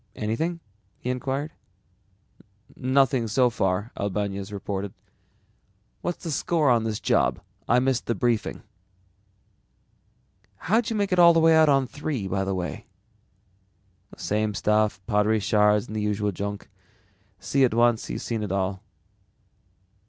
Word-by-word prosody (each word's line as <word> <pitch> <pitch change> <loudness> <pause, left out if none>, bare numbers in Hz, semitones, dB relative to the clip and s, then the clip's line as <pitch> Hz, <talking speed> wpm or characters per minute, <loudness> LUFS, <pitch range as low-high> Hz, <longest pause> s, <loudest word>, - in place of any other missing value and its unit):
"Anything?" 160 +11 -2 0.4
he 125 - -3
inquired. 135 +4 -3 1.2
"Nothing 130 -2 +2
so 125 +3 +2
far," 100 0 -1
Albañez 100 0 -3
reported. 100 0 -5 1.1
"What's 175 - -4
the 165 - -3
score 150 -2 +1
on 115 -2 +2
this 110 -2 -2
job? - - +1 0.3
I 120 - +5
missed 130 0 0
the 115 - 0
briefing." 120 -3 -1 1.9
"How'd 220 - +1
you 225 - -2
make 200 -3 0
out 165 -3 +6
on 135 -2 +3
III, 135 -7 -4
by 95 +1 0
the 95 0 -2
way?" 90 -1 -5 1.3
"Same 105 +1 -1
old 105 - -5
stuff, 105 -2 +1
pottery 105 0 +2
shards 105 +1 +3
and 110 - -8
the 110 - -1
usual 105 0 -1
junk. 100 +2 -5 0.7
See 135 +5 +1
it 120 -3 +2
once 120 -1 +3
and - - -3
you've - - -5
seen 115 -2 -3
it 105 -3 -4
all." 95 0 -1
115 Hz, 130 wpm, -25 LUFS, 105-135 Hz, 1.9 s, out